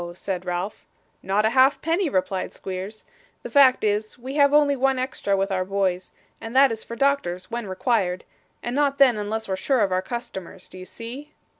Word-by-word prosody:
said 185 -1 -4
Ralph. 180 +3 -3 0.4
'Not 200 +3 +1
a 220 - +2
halfpenny,' 285 +7 +3
replied 185 -4 -2
Squeers. 190 +3 -6 0.4
'The - - -7
fact 270 -5 +5
is, 210 0 -1
we 255 +2 -7
have 285 -1 +4
only 290 -1 +4
one 270 0 +1
extra 255 -6 -1
with 195 +1 -1
our 185 -1 0
boys, 190 -1 -1 0.3
and 225 +2 -7
that 270 -1 +6
is 220 -1 -5
for 235 - -8
doctors 225 -10 0
when 235 -2 -4
required 190 -2 -1 0.4
and 240 +1 -3
not 285 -1 +1
then, 265 -4 +6
unless 215 +1 -3
we're 190 - -1
sure 255 +5 +1
of 200 -2 +1
our 185 0 +1
customers. 190 -6 -7
Do 185 - -12
you 185 - -9
see? 260 +9 -9
220 Hz, 190 wpm, -24 LUFS, 190-270 Hz, 0.4 s, that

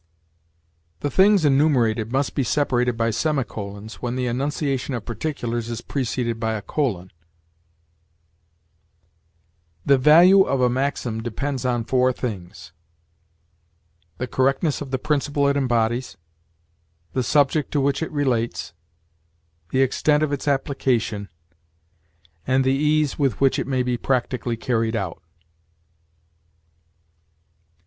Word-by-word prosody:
The 145 - -2
things 195 -3 +4
enumerated 125 -6 +2
must 135 +1 0
be 140 - 0
separated 125 -1 0
by 115 0 +1
semicolons, 110 -6 -3
when 120 0 -3
the 130 -1 -1
enunciation 135 +1 -2
of 115 - -6
particulars 120 -1 -3
is 115 0 -4
preceded 120 -3 -2
by 110 -1 -1
a 105 - -5
colon: 100 - -2 2.7
"The 140 -1 +4
value 175 +8 +7
of 135 -8 +1
a 125 -1 +3
maxim 125 -3 -2
depends 130 +3 -3
on 120 -2 0
four 130 +2 +2
things: 90 -10 -6 1.5
the 125 - -2
correctness 135 +5 0
of 145 - -6
the 130 - -1
principle 145 +1 0
it 140 - +2
embodies; 120 -4 0 1.0
the 130 - 0
subject 145 +3 +2
to 145 - +2
which 140 +2 0
it 160 - -3
relates; 120 - -1 1.0
the 135 0 +2
extent 150 +3 +2
of 150 -2 -1
its 145 - -4
application; 130 -7 0 1.2
and 130 +1 +3
the 130 0 +2
ease 150 +1 +1
with 135 -7 0
which 135 -1 +3
it - - -3
may 130 -2 0
be 125 -1 -1
practically 120 -2 -1
carried 115 -1 -1
out." 95 -6 -4
130 Hz, 120 wpm, -22 LUFS, 115-140 Hz, 2.7 s, value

